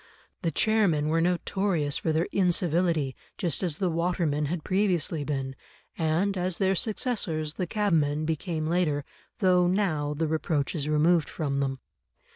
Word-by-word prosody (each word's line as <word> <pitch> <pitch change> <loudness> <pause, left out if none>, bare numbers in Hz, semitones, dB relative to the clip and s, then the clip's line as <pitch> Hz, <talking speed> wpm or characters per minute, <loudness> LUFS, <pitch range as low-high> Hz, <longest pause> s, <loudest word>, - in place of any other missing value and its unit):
The 170 - 0
chairmen 170 -5 +2
were 165 +1 +2
notorious 175 -3 0
for 160 - -1
their 160 +2 +1
incivility, 170 -6 +1 0.2
just 170 -7 0
as 170 -6 -1
the 185 -3 0
watermen 165 -3 0
had 165 +1 -3
previously 180 -6 +1
been, 135 -2 -3 0.4
and 170 +5 +1
as 180 -1 -1
their 190 0 +2
successors, 190 - -1
the 180 +1 -3
cabmen, 155 -7 +1
became 160 0 -2
later, 155 -4 0 0.4
though 180 -2 +4
now 160 -6 0
the 160 +2 0
reproach 155 -2 -1
is 150 -3 -2
removed 155 +2 +3
from 140 -3 -2
them. 135 -2 -2
165 Hz, 145 wpm, -27 LUFS, 150-180 Hz, 0.4 s, though